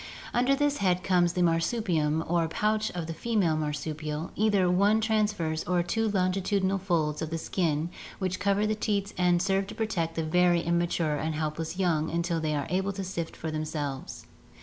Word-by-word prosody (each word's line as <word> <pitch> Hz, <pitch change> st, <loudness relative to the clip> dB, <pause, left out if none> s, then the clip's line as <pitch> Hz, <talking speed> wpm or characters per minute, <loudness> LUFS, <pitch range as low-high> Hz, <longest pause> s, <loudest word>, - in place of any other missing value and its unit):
Under 250 Hz, +3 st, +3 dB
this 290 Hz, 0 st, +1 dB
head 180 Hz, -2 st, +1 dB
comes 175 Hz, -2 st, +3 dB
the 180 Hz, -, +1 dB
marsupium 165 Hz, -3 st, +1 dB
or 170 Hz, -1 st, +1 dB
pouch 215 Hz, +5 st, 0 dB
of 175 Hz, -2 st, -3 dB
the 165 Hz, -, -4 dB
female 195 Hz, -4 st, +1 dB
marsupial, 150 Hz, +1 st, -3 dB
either 205 Hz, -3 st, +3 dB
one 200 Hz, +5 st, +4 dB
trans 215 Hz, -1 st, +2 dB
verse 160 Hz, -5 st, -2 dB
or 180 Hz, 0 st, +1 dB
two 225 Hz, +5 st, 0 dB
longitudinal 195 Hz, 0 st, +1 dB
folds 165 Hz, -5 st, 0 dB
of 160 Hz, +1 st, -3 dB
skin 165 Hz, -1 st, -1 dB, 0.3 s
which 185 Hz, -1 st, -2 dB
cover 200 Hz, +2 st, +2 dB
the 215 Hz, -, +1 dB
teats 205 Hz, -2 st, -1 dB
and 180 Hz, -1 st, +3 dB
serve 195 Hz, 0 st, +1 dB
to 210 Hz, -, -8 dB
protect 185 Hz, -8 st, -1 dB
the 165 Hz, -, -1 dB
very 175 Hz, +2 st, +3 dB
imma 170 Hz, 0 st, +2 dB
ture 155 Hz, -3 st, 0 dB
and 155 Hz, +1 st, -2 dB
helpless 155 Hz, +2 st, -3 dB
young 165 Hz, -5 st, +1 dB
until 170 Hz, 0 st, -1 dB
they 155 Hz, -1 st, -1 dB
are 145 Hz, -2 st, -1 dB
able 190 Hz, +2 st, 0 dB
to 195 Hz, 0 st, -4 dB
shift 170 Hz, -3 st, -4 dB
for 160 Hz, -, -5 dB
themselves. 150 Hz, -3 st, -4 dB
175 Hz, 185 wpm, -28 LUFS, 160-200 Hz, 0.3 s, one